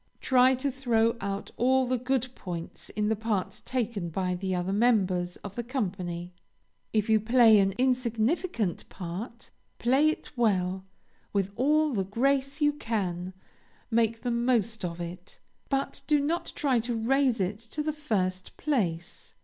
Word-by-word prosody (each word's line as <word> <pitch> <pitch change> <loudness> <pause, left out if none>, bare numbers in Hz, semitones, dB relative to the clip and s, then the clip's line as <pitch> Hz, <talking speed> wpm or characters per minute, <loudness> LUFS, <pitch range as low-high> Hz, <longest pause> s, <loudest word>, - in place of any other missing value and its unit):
Try 260 0 +4
to 275 +2 -1
throw 235 -3 +2
out 200 0 -4
all 260 +2 +3
the 250 0 0
good 260 0 0
points 175 -7 -7
in 210 0 -1
the 220 - +2
parts 210 -3 -2
taken 230 -8 -2
by 180 +2 -1
the 185 +1 -2
other 180 +2 -1
members 190 -6 +2
of 200 - -7
the 240 - -3
company. 180 -8 -3 0.6
If 215 -1 +1
you 220 -1 +4
play 225 -1 +6
an 195 0 +2
insignificant 245 - 0
part, 200 +7 -7 0.3
play 270 +6 +4
it 310 - -4
well, 190 -5 +1 0.5
with 200 -1 0
all 300 +4 +3
the 195 -4 +1
grace 275 +8 0
you 295 0 +4
can, 190 -9 -3 0.6
make 225 0 +2
the 245 - 0
most 235 -3 +1
of 170 -1 -4
it, 175 +2 -8 0.3
but 275 0 -1
do 300 -1 +4
not 315 +5 -1
try 270 -5 +2
to 235 +1 -2
raise 255 +1 +2
it 195 +2 -1
to 235 +7 -5
the 310 0 -1
first 185 -11 -2
place. 175 - -2
225 Hz, 155 wpm, -28 LUFS, 190-260 Hz, 0.6 s, play